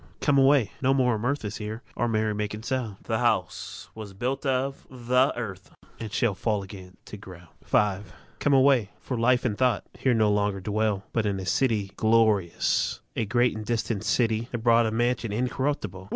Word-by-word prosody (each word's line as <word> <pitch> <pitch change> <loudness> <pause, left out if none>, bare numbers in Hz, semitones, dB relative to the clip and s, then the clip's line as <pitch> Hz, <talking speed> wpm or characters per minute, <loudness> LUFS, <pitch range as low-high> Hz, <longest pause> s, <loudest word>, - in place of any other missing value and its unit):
Come 145 -2 +3
away; 135 -5 +4
no 135 +1 +3
more 125 -2 +3
of 105 - -3
mirth 140 0 -1
Is 105 - -4
here 110 +2 -6
or 120 - 0
merry 110 -1 0
making 105 +1 -4
sound. 125 -5 -2
The 110 -1 -1
house 95 -7 -1
was 105 -3 -9
builded 130 +7 -2
of 135 +1 -1
the 125 +1 +2
earth, 95 -6 -6 0.3
And 110 -2 -6
shall 110 0 +1
fall 105 +1 -1
again 95 -1 -11
to 105 - -9
ground. 90 -4 -13
V. 100 -2 +2 0.4
Come 145 - +2
away; 130 -6 +4
for 130 - -4
Life 125 +2 +2
and 110 -4 0
Thought 125 +2 +1
Here 130 -3 +2
no 110 -2 +3
longer 100 -1 0
dwell, 105 0 -1
But 110 -2 +1
in 100 -1 -1
a 95 - -5
city 105 -3 0
glorious¢ 110 -6 +2 0.2
A 115 - 0
great 120 +2 +2
and 110 - -5
distant 115 -2 -2
city¢have 115 +1 0
bought 115 -1 +4
A - - -1
mansion 120 0 0
incorruptible. 115 -5 -2
110 Hz, 185 wpm, -26 LUFS, 105-125 Hz, 0.4 s, away